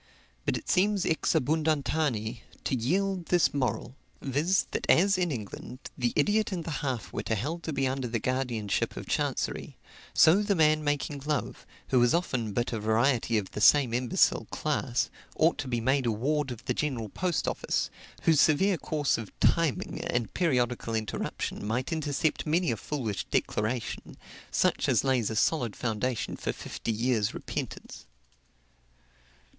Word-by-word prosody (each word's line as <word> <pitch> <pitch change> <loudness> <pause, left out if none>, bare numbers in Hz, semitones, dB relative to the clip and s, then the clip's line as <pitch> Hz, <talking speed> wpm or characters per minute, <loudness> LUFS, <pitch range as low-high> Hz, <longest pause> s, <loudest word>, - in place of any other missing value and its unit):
But - - +1
it - - -10
seems, 200 +1 +2
ex 160 - +1
abundanti, 145 -6 0 0.2
to - - 0
yield 180 - 0
this 175 -1 +3
moral 130 -2 -2 0.2
viz., 150 +8 +1
that - - -3
as, 195 +4 +5
in 180 -3 0
England, 115 +1 -6 0.2
the 120 -2 0
idiot 210 +8 +2
and 175 -3 -3
the 160 -2 -3
half 120 -10 -3
wit - - -4
are 110 - +2
held 150 +11 -3
to 160 - -4
be 135 -2 0
under 130 -1 -2
the 115 0 -1
guardianship 120 -4 -1
of - - -5
chancery, - - -2 0.3
so 175 +6 +6
the 205 -1 +1
man 155 -2 +4
making 145 -1 -1
love, 150 -1 -2 0.2
who 130 -2 +4
is 120 +6 +4
often 130 -11 -1
but 120 +4 -1
a 115 - -1
variety 115 +2 +2
of 100 -3 -3
the 105 - -5
same 125 +3 +6
imbecile 125 0 +2
class, 130 -4 -1 0.2
ought 160 +2 +3
to 135 - -3
be 120 -2 -1
made 130 +2 +1
a - - +3
ward 140 +6 0
of 120 -3 -8
the - - 0
General 125 -8 -2
Post 180 - -1
Office, - - -1 0.3
whose 160 -3 +5
severe 180 +4 +3
course 150 -5 0
of 110 -4 -7
timing 165 - +1
and 120 -2 -1
periodical 125 -8 0
interruption 110 -2 -3
might 125 +9 -1
intercept 155 0 -1
many 170 +1 +2
a - - 0
foolish 115 -6 -3
declaration, 110 +2 -2 0.3
such - - +1
as - - +3
lays 130 -5 +1
a 110 - -3
solid 120 -2 +1
foundation 120 +1 -2
for - - -2
fifty 115 - -5
years' 115 -2 0
repentance. - - -6
135 Hz, 160 wpm, -28 LUFS, 115-160 Hz, 0.3 s, so